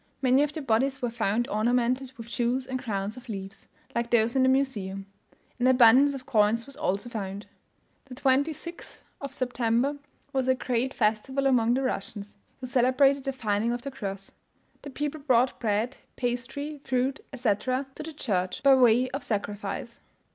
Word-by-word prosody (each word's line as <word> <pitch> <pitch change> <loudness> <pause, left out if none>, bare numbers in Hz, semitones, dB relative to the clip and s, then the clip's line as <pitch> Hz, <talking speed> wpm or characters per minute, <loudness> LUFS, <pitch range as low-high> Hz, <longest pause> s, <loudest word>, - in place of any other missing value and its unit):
Many 260 +1 +4
of 295 0 +1
the 310 -1 -6
bodies 265 +3 +1
were 240 - 0
found 230 0 0
ornamented 245 +4 +1
with 230 -1 -9
jewels 245 +2 -1
and 260 0 -3
crowns 205 -1 -3
of 250 0 -12
leaves, 195 -1 -7 0.3
like 235 0 -1
those 235 0 +2
in 265 - +4
the 260 - +5
Museum; 205 -8 -1 0.5
an 245 - +3
abundance 260 +3 +6
of 260 -1 -8
coins 220 +1 +2
was 275 - -7
also 200 +5 -1
found. 205 -3 -5 0.6
The 260 -2 -10
26th 285 +6 -1 0.2
of 280 -1 -5
September 250 +1 0 0.4
was 265 -1 0
a 260 - +4
great 255 +1 -1
festival 230 +5 0
among 240 -3 +3
the 270 - 0
Russians, 205 -4 -4 0.2
who 260 - -6
celebrated 260 +2 +3
the 270 - 0
finding 225 -3 -1
of 240 0 -3
the 275 - -5
cross. 195 -6 -6 0.5
The 285 - -8
people 295 +2 -4
brought 255 -2 +2
bread, 225 +4 0 0.2
pastry, 260 +4 -3
fruit, 260 +2 0
etc., 255 +1 0
to - - -8
the 315 +1 -7
church, 190 -10 -2
by 275 -1 +7
way 250 -1 +5
of 275 +2 -4
sacrifice. 205 +2 -4
250 Hz, 170 wpm, -27 LUFS, 220-270 Hz, 0.6 s, by